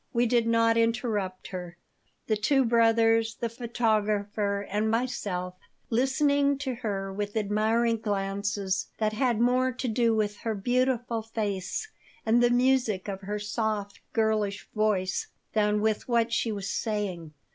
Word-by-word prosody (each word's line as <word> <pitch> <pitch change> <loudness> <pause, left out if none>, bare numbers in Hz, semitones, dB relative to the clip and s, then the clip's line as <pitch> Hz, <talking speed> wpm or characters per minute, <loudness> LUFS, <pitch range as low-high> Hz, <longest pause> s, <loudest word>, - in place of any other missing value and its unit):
We 240 0 +3
did 235 -1 +2
not 230 0 +3
interrupt 230 -5 -1
her, 180 -2 -7 0.5
the 220 - +1
two 265 +5 +2
brothers, 225 -1 +3
the 235 - -3
photographer, 210 -3 0
and 210 +2 0
myself 205 -6 -2 0.4
listening 280 +3 +2
to 270 -2 -3
her 200 -5 -3
with 205 +2 -3
admiring 220 +3 +1
glances 200 -2 -1
that 215 -1 0
had 240 0 +1
more 250 +2 +3
to 255 +1 -4
do 230 0 +2
with 210 -1 0
her 225 -2 -3
beautiful 245 +1 0
face 215 - -3 0.4
and 230 +2 +4
the 240 - +5
music 245 -5 +2
of 195 -1 -4
her 205 +2 -3
soft, 210 -1 -2
girlish 215 -3 0
voice 200 -4 0 0.3
than 210 -1 +2
with 215 -1 0
what 235 -1 +1
she 230 -1 +1
was 200 -2 -4
saying. 190 -9 -3
220 Hz, 140 wpm, -28 LUFS, 205-235 Hz, 0.5 s, the